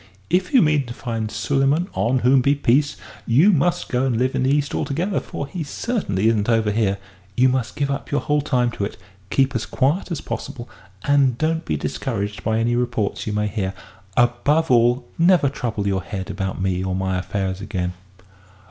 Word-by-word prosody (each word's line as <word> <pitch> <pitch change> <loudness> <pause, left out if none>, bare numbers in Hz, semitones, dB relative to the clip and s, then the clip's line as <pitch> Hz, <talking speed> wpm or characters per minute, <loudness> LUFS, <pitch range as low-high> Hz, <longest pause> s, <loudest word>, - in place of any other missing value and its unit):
If 180 +1 +1
you 255 - +6
mean 150 -4 +2
to 120 - -7
find 115 -3 -3
Suleyman 140 +8 +1
(on 125 +2 +1
whom 130 +1 +5
be 140 +3 +3
peace!) 140 +1 +2 0.3
you 150 - +5
must 175 0 +1
go 125 0 0
and 130 -4 +1
live 130 +2 +1
in - - 0
the 130 - +2
East 145 +1 +1
altogether 165 +7 -1
for - - -6
he 160 +4 -5
certainly 140 - -1
isn't 110 -1 +2
over 110 -2 +2
here; 100 -2 +1 0.4
you 130 +1 +5
must 130 -2 -1
give 140 -1 -1
up 140 - -4
your 145 - 0
whole 150 0 +1
time 125 -4 +1
to 105 - -4
it, 100 - -4 0.3
keep 135 +3 +2
as 115 - -2
quiet 145 +10 0
as 165 - -2
possible, 120 0 -6 0.4
and 140 -4 +3
don't 160 +3 0
be - - -1
discouraged 105 -6 -3
by 110 0 +1
any 115 +1 +1
reports 120 -5 -1
you 105 - -1
may 105 0 0
hear. 100 -2 -2 0.4
Above 135 +6 +2
all, 120 +1 +3
never 170 -4 +5
trouble 115 -7 -3
your 95 -1 0
head 95 0 -5
about 95 -1 -3
me 95 -1 0
or 95 -1 -2
my 95 -1 -1
affairs 95 0 -3
again!" 95 -4 -3
125 Hz, 195 wpm, -22 LUFS, 105-145 Hz, 0.4 s, you